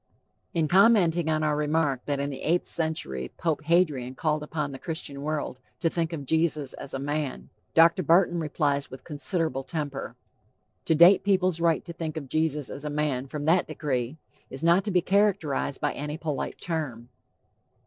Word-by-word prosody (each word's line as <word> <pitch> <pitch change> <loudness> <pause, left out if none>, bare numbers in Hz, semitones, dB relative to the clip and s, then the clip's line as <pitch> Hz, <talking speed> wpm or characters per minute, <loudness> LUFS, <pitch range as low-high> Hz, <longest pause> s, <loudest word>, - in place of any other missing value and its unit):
In 160 -2 +2
commenting 175 -4 +4
on 155 0 +1
our 150 -1 +1
remark 150 -3 0
that 140 -1 0
in 140 +1 -2
the 135 - -7
eighth 175 +3 +1
century 70 - -2
"Pope 160 -2 -1
Hadrian 150 -7 +2
called 155 +1 0
upon 150 -1 -3
the 135 - -8
Christian 150 -4 -5
world 150 -3 -3 0.2
to 165 - +1
think 165 -1 -1
of 150 -4 -5
Jesus 155 -2 0
as 135 - -7
a - - -3
man," 145 0 -3 0.2
Dr. 165 +3 +6
Barton 175 +1 +3
replies 145 -3 0
with 130 - -10
considerable 155 -2 -1
temper: 145 -1 -5 0.7
"To 160 - +3
date 175 +5 +7
people's 185 -4 +2
right 165 -1 +2
to 170 - -7
think 160 -2 -5
of 140 -4 -6
Jesus 150 -2 0
as 140 - -7
a 150 - -3
man 145 -3 -1
from 145 +1 -5
that 170 +3 +3
decree 130 -1 -2 0.3
is 135 +4 -5
not 170 +3 +4
to - - -1
be 180 -2 +3
characterized 185 -9 +1
by - - 0
any 150 +1 -4
polite 150 -5 -3
term." 135 -9 -4
155 Hz, 180 wpm, -27 LUFS, 140-170 Hz, 0.7 s, date